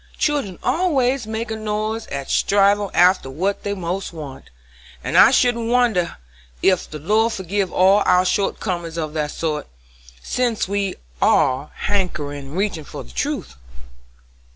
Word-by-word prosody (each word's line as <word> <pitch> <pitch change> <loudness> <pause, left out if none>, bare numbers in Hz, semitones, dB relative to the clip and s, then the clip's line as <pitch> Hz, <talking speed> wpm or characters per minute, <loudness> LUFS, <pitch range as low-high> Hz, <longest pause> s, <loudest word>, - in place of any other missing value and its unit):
Children 285 - 0
always 270 -8 +1
make 225 +1 -4
a - - -1
noise 215 +1 -3
a 140 -1 -4
strivin' 200 +3 +2
after 180 -5 +4
what 185 +9 -2
they 200 - -3
want 185 0 -3
most, 145 -5 -9 0.5
and - - -3
I - - +9
shouldn't 235 -2 +2
wonder 235 -8 +2 0.5
ef 185 -2 +2
the 155 - -6
Lord 215 +9 +1
forgive 190 0 -2
all 195 +3 +4
our 180 0 +4
short 195 +2 0
comin's 175 -4 -3
of 155 -2 -3
that 150 -2 -1
sort, 155 -1 -3 0.5
sense 235 - -1
we 200 -1 -1 0.3
are 130 +3 +3
hankerin' 150 -8 -2
and 150 +6 -7
reachin' 195 -5 -1
for - - -8
the - - -15
truth." 60 +1 -3
195 Hz, 150 wpm, -21 LUFS, 160-220 Hz, 0.5 s, I